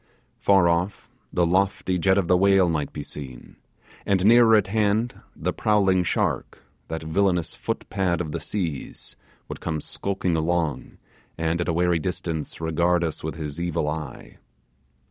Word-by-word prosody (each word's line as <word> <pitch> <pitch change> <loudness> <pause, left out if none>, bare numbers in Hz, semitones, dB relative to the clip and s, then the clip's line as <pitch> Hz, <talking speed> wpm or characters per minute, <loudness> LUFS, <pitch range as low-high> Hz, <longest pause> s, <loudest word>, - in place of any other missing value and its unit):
Far 95 -3 +4
off, 85 +4 -1 0.2
the 90 - +2
lofty 95 +1 +1
jet 95 +2 +3
of 95 -4 +1
the 90 - +4
whale 95 0 +4
might 75 -3 -1
be 75 - -6
seen, 65 -4 -9 0.5
and 95 -1 +1
nearer 115 0 +7
at 105 -2 +4
hand 110 +3 0
the - - -2
prowling 95 -4 +2
shark, 85 - -1 0.2
that 80 0 -5
villainous 90 +1 +1
footpad 95 -4 -2
of 80 -4 -3
the - - -3
seas, 85 -9 -4 0.3
would - - -7
come 80 -2 -2
skulking 95 0 -2
along, 80 -1 -1 0.4
and, 80 +1 0
at 85 - -2
a - - +1
wary 85 0 +2
distance, 85 -3 -4
regard 85 +2 +1
us 80 -2 -3
with 80 -1 -4
his 75 -1 -5
evil 85 -3 -1
eye. 75 -2 -6
85 Hz, 155 wpm, -24 LUFS, 80-95 Hz, 0.5 s, nearer